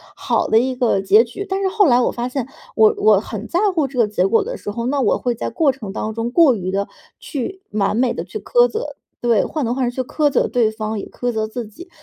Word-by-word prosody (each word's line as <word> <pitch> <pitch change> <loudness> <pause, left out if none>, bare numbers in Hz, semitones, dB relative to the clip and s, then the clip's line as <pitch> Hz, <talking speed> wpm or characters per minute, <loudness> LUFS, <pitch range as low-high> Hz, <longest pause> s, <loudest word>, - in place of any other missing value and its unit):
好 - - 0
的 220 - +3
一 255 +3 +1
个 245 -5 +1
结 205 +3 +5
局。 250 +12 -7
但 385 0 -2
是 390 - +1
后 410 +1 +3
来 250 -5 +4
我 - - +1
发 240 0 -3
现 255 -1 -3 0.3
我 435 -1 +6
我 415 +2 +4
很 - - -7
在 350 - 0 0.2
乎 315 -4 +2
这 260 -1 -6
个 230 - +4
结 205 -3 0
果 225 +4 +3
的 - - -5
时 205 - -6
候， 235 +3 -3
那 280 +2 0
我 265 - +2
会 245 -1 -1
在 230 - -4
过 280 +4 +2
程 225 -7 -8
当 215 - -3
中 230 +1 -2
过 295 -3 +5
于 185 -3 -4
地 200 +1 -1 0.3
去 370 +8 -5
完 205 -1 0
美 245 +1 +1
地 - - -3
去 - - -7
苛 - - +3
责 450 +1 -5 0.3
对， 235 -4 +2
患 305 - -3
得 240 0 -1
患 260 -1 0
失 - - -20
去 - - +1
苛 290 +3 0
责 - - +2
对 235 -4 +1
方 220 -1 -4
也 - - -6
苛 245 0 -3
责 220 -2 -1
自 225 +1 -6
己， 340 - -13
245 Hz, 290 characters per minute, -19 LUFS, 220-300 Hz, 0.3 s, 我